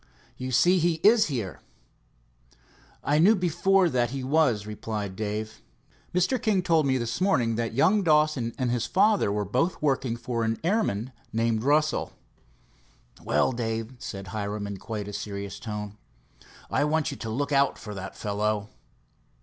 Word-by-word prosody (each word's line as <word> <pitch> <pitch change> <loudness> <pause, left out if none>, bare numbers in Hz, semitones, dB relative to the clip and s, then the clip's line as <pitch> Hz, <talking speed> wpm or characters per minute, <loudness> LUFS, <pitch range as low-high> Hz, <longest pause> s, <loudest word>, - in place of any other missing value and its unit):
"You 130 0 -5
see 180 +9 +4
he 170 +1 +2
is 215 +2 +6
here." 110 - -4 1.4
"I 150 +1 +2
knew 200 +7 +6
before 180 +1 +2
this 165 - -4
that 120 -2 +2
he 135 +1 -4
was," 130 -7 +2
replied 105 -2 -5
Dave. 110 +1 -4 0.5
"Mr. 185 +9 +1
King 200 -5 +1
told 165 -5 +3
me 130 -1 +2
this 120 +2 -3
morning 125 -12 +2
that 115 0 -2
young 200 - +4
Dawson 150 -8 +2
and 125 -2 0
his 120 -1 -1
father 205 - +3
were 105 0 -1
both 130 - 0
working 135 -5 0
for 120 -1 -2
an 115 0 0
airman 165 - 0 0.2
named 115 -1 0
Russell." 150 +2 +1 1.1
"Well, 75 - +2
Dave," 115 0 -3
said 95 -3 -7
Hiram 105 -1 -3
in 100 -1 -5
quite 105 +1 -5
a 105 - -7
serious 100 -1 -5
tone, 105 -2 -6 0.7
"I - - +2
want 155 +1 +1
you 140 - -7
to 115 - -6
look 140 +6 -2
out 140 -1 +3
for 105 -2 -8
that 95 0 -7
fellow." 105 0 -1
120 Hz, 160 wpm, -26 LUFS, 105-155 Hz, 1.4 s, is